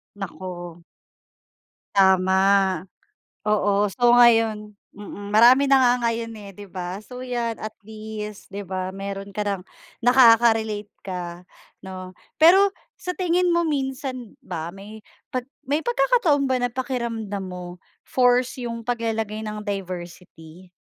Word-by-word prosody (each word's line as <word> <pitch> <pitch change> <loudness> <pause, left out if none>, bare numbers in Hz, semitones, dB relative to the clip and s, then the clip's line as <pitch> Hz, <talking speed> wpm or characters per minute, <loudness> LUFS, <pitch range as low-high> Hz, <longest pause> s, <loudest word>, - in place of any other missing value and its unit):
Naku. 175 -3 -8 1.1
Tama. 190 -1 +4 1.1
Oo, 205 -1 +2
so 240 +5 +3
ngayon 225 -3 +4 0.2
mm, 205 0 -9
marami 240 +6 +6
na 275 - +7
nga 250 -2 +5 0.2
ngayon, 230 0 -3
eh, 205 -1 -10
'di 205 +2 -11
ba? 180 0 -5
So 250 0 -9
'yan 240 -2 -2
at 215 0 -5
least, 215 -1 -8
'di 200 0 -6
ba, 185 0 -3
meron 195 +1 -6
ka 210 +1 -3
ng 200 -2 -2 0.4
nakaka-relate 230 -4 +4 0.2
ka 180 -2 -6 0.4
'no? 185 -1 -8 0.3
Pero 380 +5 +7 0.3
sa 360 - -4
tingin 360 0 +1
mo 340 - +3
minsan 265 -5 -3
ba 165 -9 -5
may 210 +3 -11 0.3
'pag 255 -3 -2 0.2
may 290 +2 +2
pagkakataon 405 - +2
ba 260 - +2
na 245 - +1
pakiramdam 230 -6 -3
mo 180 -1 -8 0.3
forced 250 0 +2
yung 230 -1 -4
paglalagay 225 -2 -2
ng 210 0 -5
diversity 180 -3 -7
215 Hz, 125 wpm, -23 LUFS, 195-245 Hz, 1.1 s, na